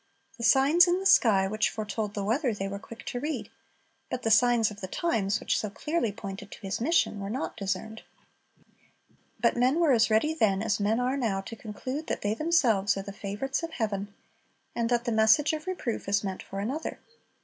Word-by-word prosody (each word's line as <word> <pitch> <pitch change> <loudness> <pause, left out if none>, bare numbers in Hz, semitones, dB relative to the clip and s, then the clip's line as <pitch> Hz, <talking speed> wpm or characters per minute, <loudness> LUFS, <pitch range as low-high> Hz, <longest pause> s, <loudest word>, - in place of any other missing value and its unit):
The - - -5
signs 275 +9 +5
in 350 +1 +2
the 385 - -6
sky, 200 - +5
which 215 +2 +1
foretold 210 -1 -4
the 200 - -2
weather, 235 +3 0
they 195 -1 -3
were 200 0 -5
quick 230 +2 -12
to 245 - -3
read; 300 +4 -4 0.6
but 255 -1 -4
the 225 - +1
signs 225 0 +4
of 210 - -11
the 190 - -4
times, 215 - 0
which - - 0
so 215 - -3
clearly 245 +2 -1
pointed 200 -1 -8
to - - -11
His 195 +1 -4
mission, 260 -6 +2
were 195 0 -5
not 255 +6 -3
discerned. 200 +2 -4 1.4
But 235 - +2
men 255 +6 +2
were 330 -4 +4
as 230 -1 +4
ready 220 +9 +2
then 210 -9 +1
as 220 -1 0
men 210 +3 +1
are 250 +2 0
now 215 -7 -1
to 225 +4 -8
conclude 255 +8 -6
that - - -3
they 205 +1 +1
themselves 235 - +2
are 195 - -3
the 200 0 -8
favorites 205 +8 -3
of 330 -1 -6
heaven, 205 -3 -2 0.6
and 230 -1 0
that 240 -1 +1
the 240 - 0
message 220 +8 +4
of 310 +3 -5
reproof 250 - -3
is 200 0 +2
meant 190 -2 -4
for 195 - -7
another. 260 +10 -3
225 Hz, 205 wpm, -28 LUFS, 200-265 Hz, 1.4 s, signs